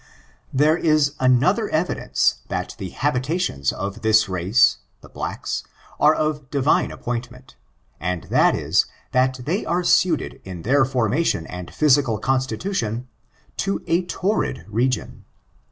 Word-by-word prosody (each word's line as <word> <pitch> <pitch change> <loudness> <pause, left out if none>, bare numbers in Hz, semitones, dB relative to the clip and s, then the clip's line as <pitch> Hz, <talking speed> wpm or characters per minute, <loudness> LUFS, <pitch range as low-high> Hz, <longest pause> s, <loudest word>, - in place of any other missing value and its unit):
There 150 +4 +3
is 155 -4 +2
another 130 -1 +3
evidence, - - 0
that - - -3
the 95 - -5
habitations 135 - -1
of 100 0 -5
this 110 -1 +4
race 95 +8 +3 0.2
(the - - -15
blacks) - - -4 0.4
are 150 +1 +5
of 150 -3 -2
Divine 140 +1 +2
appointment, 125 +2 -6 0.4
and 90 +1 -2
that - - +4
is, - - +1 0.2
that 130 0 +1
they 180 +9 -1
are 175 +2 0
suited 175 -2 +2
in 90 -3 -8
their 135 +3 +3
formation 125 - 0
and 90 +1 -8
physical 140 -6 +3
constitution, 125 - -2 0.5
to 100 +1 -2
a 170 +3 +1
torrid 200 +4 -1
region. 120 +5 -1
130 Hz, 125 wpm, -22 LUFS, 110-150 Hz, 0.5 s, are